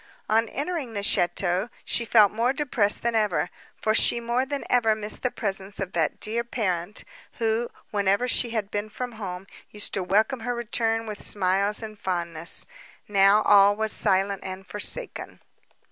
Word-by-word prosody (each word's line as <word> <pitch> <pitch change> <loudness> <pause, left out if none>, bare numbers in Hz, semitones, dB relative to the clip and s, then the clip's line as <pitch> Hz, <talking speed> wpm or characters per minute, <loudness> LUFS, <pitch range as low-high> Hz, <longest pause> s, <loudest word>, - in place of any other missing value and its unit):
On 225 +1 +2
entering 290 -4 -4
the 200 - -2
château 180 +1 +1 0.2
she 235 - 0
felt 215 -3 +5
more 235 +4 +1
depressed 250 -8 +1
than 235 0 0
ever, 210 -5 0 0.2
for 215 - 0
she 235 - +4
more 240 +3 -1
than 285 0 -4
ever 225 -3 +3
missed 215 0 -5
the 255 - +1
presence 200 -3 -3
of 190 -1 -3
that 165 -3 0
dear 230 +2 -1
parent, 205 -5 -2 0.3
who, 225 +1 0 0.2
whenever 200 +3 +1
she 245 -1 +1
had 215 -3 -3
been 205 +1 -3
from 245 +3 -5
home, 190 -4 -7 0.2
used 210 -1 -2
to 195 - 0
welcome 215 +8 +1
her 245 +2 -3
return 225 -1 -1
with 210 -2 -6
smiles 200 +2 +2
and 215 -1 -8
fondness; 170 -3 -1 0.4
now, 200 +1 +5
all 205 0 +6
was 220 0 0
silent 195 -1 +1
and 190 0 -7
forsaken. 210 - -1
210 Hz, 165 wpm, -25 LUFS, 195-235 Hz, 0.4 s, all